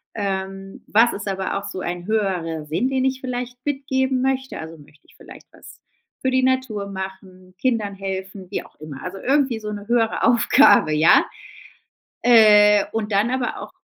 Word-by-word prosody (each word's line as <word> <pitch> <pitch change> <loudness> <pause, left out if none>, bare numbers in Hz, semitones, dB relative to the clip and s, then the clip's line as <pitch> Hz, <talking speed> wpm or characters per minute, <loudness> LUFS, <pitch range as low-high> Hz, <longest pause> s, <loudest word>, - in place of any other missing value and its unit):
Ähm, 195 -1 -5
was 230 +3 +4
ist 200 - -7
aber 195 0 -2
auch 200 - -5
so - - -6
ein 175 0 -5
höherer 180 -7 -2
Sinn, 165 - -1
den 265 -1 0
ich 260 0 -1
vielleicht 250 -1 -5
mitgeben 265 -2 -1
möchte? 265 0 -2
Also, 160 +1 -9
möchte 150 0 -20
ich - - -23
vielleicht - - -15
was - - -15 0.4
für 260 - 0
die 260 0 +2
Natur 260 -6 -1
machen, 190 -1 -9
Kindern 225 -5 -1
helfen, 190 0 -6
wie 205 - -4
auch - - -20
immer. 150 -3 -9
Also 190 +2 -6
irgendwie 265 -2 +1
so 210 -1 -6
'ne 205 0 -8
höhere 230 -1 +1
Aufgabe, 235 - +5
ja? 155 +2 +5 1.0
Äh, 210 -3 +6
und 220 -1 -3
dann 205 +4 +2
aber 255 -1 -2
auch - - -9
210 Hz, 175 wpm, -21 LUFS, 190-255 Hz, 1.0 s, Äh